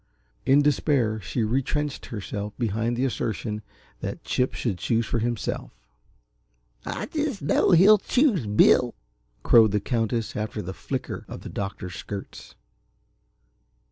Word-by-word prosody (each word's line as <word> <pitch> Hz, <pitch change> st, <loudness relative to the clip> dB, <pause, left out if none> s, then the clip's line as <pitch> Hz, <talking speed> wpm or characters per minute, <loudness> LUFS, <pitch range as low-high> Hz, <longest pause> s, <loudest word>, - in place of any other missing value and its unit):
In 140 Hz, +2 st, +6 dB
despair 135 Hz, -6 st, +2 dB
she 95 Hz, +5 st, -2 dB
retrenched 135 Hz, +5 st, -1 dB
herself 105 Hz, -1 st, -5 dB
behind 115 Hz, 0 st, -1 dB
the 130 Hz, -, +1 dB
assertion 110 Hz, -3 st, -2 dB, 0.4 s
that -, -, -5 dB
Chip 125 Hz, 0 st, 0 dB
should 100 Hz, -8 st, -2 dB
choose 115 Hz, +5 st, +1 dB
for 115 Hz, -, -1 dB
himself. 120 Hz, 0 st, -2 dB, 1.1 s
"I -, -, -4 dB
just 295 Hz, -, -3 dB
know 145 Hz, -, +3 dB
he'll 195 Hz, +4 st, +7 dB
choose 225 Hz, -, +2 dB
Bill," 115 Hz, +3 st, +4 dB, 0.5 s
crowed 115 Hz, -2 st, +6 dB
the 105 Hz, -, +3 dB
Countess 115 Hz, -1 st, -1 dB
after 105 Hz, 0 st, -3 dB
the 95 Hz, +2 st, -5 dB
flicker 80 Hz, -, -5 dB
of -, -, -8 dB
the -, -, -8 dB
doctor's 95 Hz, -2 st, -5 dB
skirts. 100 Hz, +2 st, -8 dB
115 Hz, 130 wpm, -25 LUFS, 105-140 Hz, 1.1 s, he'll